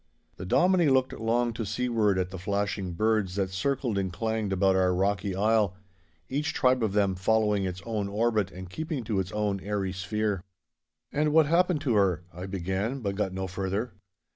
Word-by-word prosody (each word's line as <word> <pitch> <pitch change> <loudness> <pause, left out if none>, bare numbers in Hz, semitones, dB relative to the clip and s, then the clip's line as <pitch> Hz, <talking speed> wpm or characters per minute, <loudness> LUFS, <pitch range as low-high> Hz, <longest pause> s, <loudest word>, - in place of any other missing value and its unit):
The 90 - -6
Dominie 175 - +4
looked 130 -1 +2
long 115 +1 0
to 115 - -3
seaward 110 -2 +1
at 90 0 -1
the 95 - -6
flashing 100 -1 -2
birds 110 -1 +1
that 95 -2 -1
circled 120 +2 -1
and 95 -1 -2
clanged 110 +2 -2
about 95 0 +3
our 90 -1 +3
rocky 100 0 0
isle, 105 -1 +2 0.5
each 150 +4 -2
tribe 130 -2 +3
of 110 -3 0
them 100 -2 +2
following 105 +1 +1
its 90 0 -5
own 110 -3 -2
orbit 105 -1 +1
and 95 -1 -9
keeping 155 - -4
to 105 -3 -1
its 95 -1 -3
own 105 -1 -1
airy 95 -1 -2
sphere. 100 +1 -1 0.7
'And 150 0 +1
what 160 -1 +6
happened 170 0 +2
to 135 -6 +1
her?' 95 -5 +2
I 90 +3 -6
began, 95 +7 -2
but 100 -3 -1
got 95 -1 -1
no 95 +1 -3
further. 95 +5 -3
105 Hz, 185 wpm, -28 LUFS, 95-115 Hz, 0.7 s, what